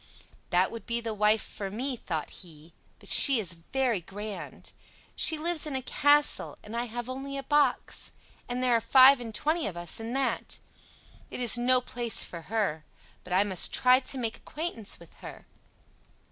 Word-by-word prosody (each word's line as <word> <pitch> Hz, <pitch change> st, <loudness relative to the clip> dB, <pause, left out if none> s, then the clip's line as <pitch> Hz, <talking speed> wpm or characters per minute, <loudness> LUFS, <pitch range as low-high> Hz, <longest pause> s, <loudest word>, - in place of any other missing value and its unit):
"That 180 Hz, +2 st, +2 dB
would 230 Hz, -, -9 dB
be 235 Hz, 0 st, 0 dB
the 230 Hz, -1 st, -4 dB
wife 210 Hz, +1 st, +3 dB
for 200 Hz, -2 st, -6 dB
me," 250 Hz, +6 st, -3 dB
thought 160 Hz, -9 st, -5 dB
he; 165 Hz, -2 st, -15 dB, 0.2 s
"but -, -, -15 dB
she 275 Hz, -4 st, +7 dB
is 180 Hz, -6 st, -2 dB, 0.2 s
very 255 Hz, -7 st, 0 dB
grand. 205 Hz, +4 st, -8 dB, 0.4 s
She 315 Hz, -, +3 dB
lives 320 Hz, 0 st, 0 dB
in 285 Hz, -, -3 dB
a 260 Hz, -, -2 dB
castle, 290 Hz, +3 st, +2 dB
and 215 Hz, +2 st, -9 dB
I 240 Hz, +1 st, -1 dB
have 240 Hz, +1 st, -6 dB
only 270 Hz, +2 st, -6 dB
a 275 Hz, -, -5 dB
box, 295 Hz, 0 st, 0 dB, 0.4 s
and 250 Hz, +1 st, -2 dB
there 250 Hz, -1 st, +2 dB
are 230 Hz, -, +2 dB
five 260 Hz, +4 st, +7 dB
and 240 Hz, -2 st, -7 dB
twenty 310 Hz, +9 st, 0 dB
of 180 Hz, -4 st, -6 dB
us 175 Hz, +5 st, -3 dB
in 225 Hz, +2 st, -5 dB
that. 270 Hz, 0 st, -1 dB, 0.7 s
It -, -, -7 dB
is 245 Hz, -1 st, +2 dB
no 250 Hz, +1 st, +3 dB
place 240 Hz, -2 st, 0 dB
for 170 Hz, -, -8 dB
her. 205 Hz, -9 st, -1 dB, 0.4 s
But 180 Hz, -, -6 dB
I 190 Hz, +2 st, +4 dB
must 190 Hz, -4 st, +2 dB
try 255 Hz, 0 st, +5 dB
to 270 Hz, 0 st, -1 dB
make 230 Hz, -3 st, -3 dB
acquaintance 300 Hz, -, -5 dB
with 170 Hz, -1 st, -16 dB
her." -, -, -10 dB
235 Hz, 185 wpm, -28 LUFS, 205-265 Hz, 0.7 s, she